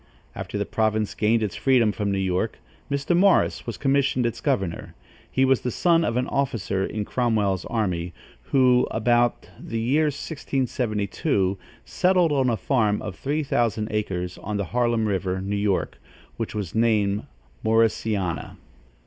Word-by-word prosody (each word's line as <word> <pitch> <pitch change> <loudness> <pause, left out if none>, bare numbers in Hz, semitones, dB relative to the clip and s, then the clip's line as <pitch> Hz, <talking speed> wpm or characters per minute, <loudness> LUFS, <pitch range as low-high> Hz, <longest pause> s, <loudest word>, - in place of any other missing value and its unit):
After - - -5
the - - -1
province 110 -1 0
gained 110 +1 +2
its 100 -5 -3
freedom 120 +1 +3
from 105 -1 -2
New 100 - 0
York, 95 +3 -1 0.3
Mr. 140 +4 0
Morris 190 -6 +3
was 115 - -4
commissioned 135 -2 +1
its 120 - -2
governor. 95 -4 -2 0.3
He 130 - +2
was 135 -1 +3
the 125 - -2
son 170 +6 +2
of 120 -5 0
an 125 - +1
officer 115 -10 -1
in 105 +1 -3
Cromwell's 105 -7 0
army, 90 -7 -2 0.3
who, 125 - +4
about 120 +1 +1
the 115 - -4
year 135 +7 +2
1672, 125 - -1 0.3
settled 180 -3 +2
on 135 -3 +2
a 115 - 0
farm 110 -7 +1
of 90 - -5
three 150 +7 -2
thousand 115 -5 0
acres 90 -4 -3
on 105 0 -4
the 100 - -1
Harlem 120 -2 +2
River, 95 -2 -1
New 100 +2 -3
York, 100 -11 -1 0.4
which - - -4
was 100 -6 -4
named 105 -3 +1 0.4
Morrisania. 110 -5 0
110 Hz, 150 wpm, -24 LUFS, 100-130 Hz, 0.4 s, who